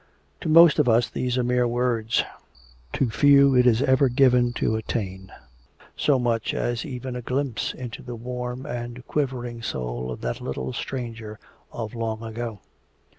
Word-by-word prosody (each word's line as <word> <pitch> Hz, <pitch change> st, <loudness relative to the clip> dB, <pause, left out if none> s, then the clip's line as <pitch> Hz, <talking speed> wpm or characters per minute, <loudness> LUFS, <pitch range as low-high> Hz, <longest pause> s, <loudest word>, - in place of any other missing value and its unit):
To -, -, -4 dB
most 165 Hz, 0 st, +7 dB
of 140 Hz, -5 st, +4 dB
us 115 Hz, +1 st, +3 dB
these 125 Hz, 0 st, -1 dB
are 125 Hz, -, +1 dB
mere 125 Hz, 0 st, +2 dB
words. 120 Hz, -2 st, +1 dB, 0.7 s
To 125 Hz, -4 st, 0 dB
few 140 Hz, +1 st, +6 dB
is 125 Hz, -2 st, +4 dB
it -, -, 0 dB
ever 130 Hz, +1 st, +4 dB
given 125 Hz, -1 st, +4 dB
to 110 Hz, -, 0 dB
attain 95 Hz, -4 st, -4 dB, 0.6 s
so 145 Hz, -3 st, +2 dB
much 120 Hz, -3 st, 0 dB
as 120 Hz, -1 st, -1 dB
even 130 Hz, -2 st, -6 dB
a 125 Hz, -, -4 dB
glimpse 125 Hz, -2 st, -2 dB
into 125 Hz, -2 st, -7 dB
the 120 Hz, -, -7 dB
warm 125 Hz, +2 st, -5 dB
and 120 Hz, -2 st, -6 dB
quivering 125 Hz, -5 st, -3 dB
soul 60 Hz, -, -4 dB
of 60 Hz, -, -6 dB
that -, -, -3 dB
little 65 Hz, -1 st, -4 dB
stranger 115 Hz, -4 st, -5 dB, 0.3 s
of 110 Hz, -3 st, -5 dB
long 115 Hz, -1 st, -3 dB
ago. 115 Hz, -2 st, -5 dB
120 Hz, 160 wpm, -24 LUFS, 115-125 Hz, 0.7 s, most